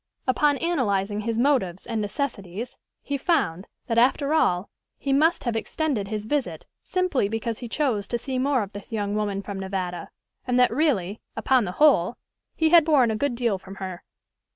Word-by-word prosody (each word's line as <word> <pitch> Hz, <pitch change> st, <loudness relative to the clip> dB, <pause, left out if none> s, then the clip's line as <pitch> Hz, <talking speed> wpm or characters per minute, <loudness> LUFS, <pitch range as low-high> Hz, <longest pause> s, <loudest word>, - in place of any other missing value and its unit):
Upon 285 Hz, +2 st, +3 dB
analyzing 210 Hz, -, 0 dB
his 225 Hz, +1 st, -2 dB
motives 230 Hz, -9 st, +1 dB
and 225 Hz, -2 st, -2 dB
necessities, 205 Hz, -, -4 dB, 0.3 s
he 280 Hz, -1 st, -2 dB
found, 195 Hz, -, 0 dB, 0.2 s
that, 230 Hz, -1 st, +2 dB
after 280 Hz, +4 st, +3 dB
all, 180 Hz, -, +2 dB, 0.3 s
he 275 Hz, -, -1 dB
must 315 Hz, +5 st, +3 dB
have 235 Hz, -3 st, -1 dB
extended 230 Hz, -2 st, -1 dB
his 210 Hz, 0 st, -4 dB
visit 280 Hz, +3 st, -2 dB, 0.2 s
simply 365 Hz, -, 0 dB
because 225 Hz, +1 st, -3 dB
he 240 Hz, -, -7 dB
chose 225 Hz, -8 st, 0 dB
to 240 Hz, -, -1 dB
see 255 Hz, +2 st, -3 dB
more 265 Hz, -3 st, +2 dB
of 200 Hz, -, -8 dB
this 205 Hz, +2 st, -9 dB
young 205 Hz, -2 st, -2 dB
woman 205 Hz, -2 st, -1 dB
from 195 Hz, 0 st, -5 dB
Nevada, 185 Hz, -3 st, -4 dB, 0.4 s
and 250 Hz, 0 st, +2 dB
that 250 Hz, -, +5 dB
really, 225 Hz, -, 0 dB
upon 255 Hz, -4 st, +2 dB
the 180 Hz, -, -4 dB
whole, 245 Hz, -, +4 dB, 0.4 s
he 320 Hz, -1 st, +3 dB
had 335 Hz, -1 st, +7 dB
borne 280 Hz, -7 st, +4 dB
a -, -, -1 dB
good 265 Hz, +2 st, -1 dB
deal 235 Hz, -5 st, 0 dB
from 195 Hz, +1 st, -11 dB
her. 185 Hz, -3 st, -6 dB
230 Hz, 180 wpm, -25 LUFS, 200-280 Hz, 0.4 s, had